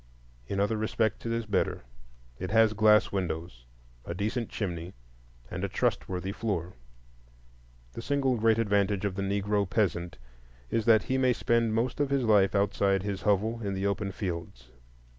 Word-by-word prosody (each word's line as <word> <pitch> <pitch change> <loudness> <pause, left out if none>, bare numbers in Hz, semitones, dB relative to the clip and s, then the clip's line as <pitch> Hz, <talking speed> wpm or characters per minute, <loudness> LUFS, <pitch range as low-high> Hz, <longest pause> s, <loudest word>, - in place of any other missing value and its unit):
In 100 - -2
other 105 +2 +1
respects 110 0 -1
it - - -1
is 115 0 -1
better; 100 -10 -1 0.6
it 95 - -4
has 110 +1 +4
glass 105 0 +4
windows, 80 -9 -4 0.4
a 85 - -5
decent 110 +5 -2
chimney, 90 -4 -4 0.6
and - - -4
a - - -1
trustworthy 95 +1 -1
floor. 95 -5 -3 1.2
The - - -6
single 135 0 +1
great 115 -1 +3
advantage 100 -2 +1
of 100 - -1
the 100 - -4
Negro 100 0 0
peasant 90 -4 -1 0.5
is 115 - 0
that 110 -3 +5
he 130 0 -1
may 130 -1 +3
spend 115 -2 +1
most 120 +4 -1
of 145 -2 +1
his 140 -2 +1
life 105 -3 +4
outside 100 -1 +2
his 100 -2 -3
hovel, 110 +3 +1
in 100 -2 -2
the 95 +1 -2
open 100 0 -1
fields. 85 - -6
100 Hz, 160 wpm, -28 LUFS, 95-115 Hz, 1.2 s, that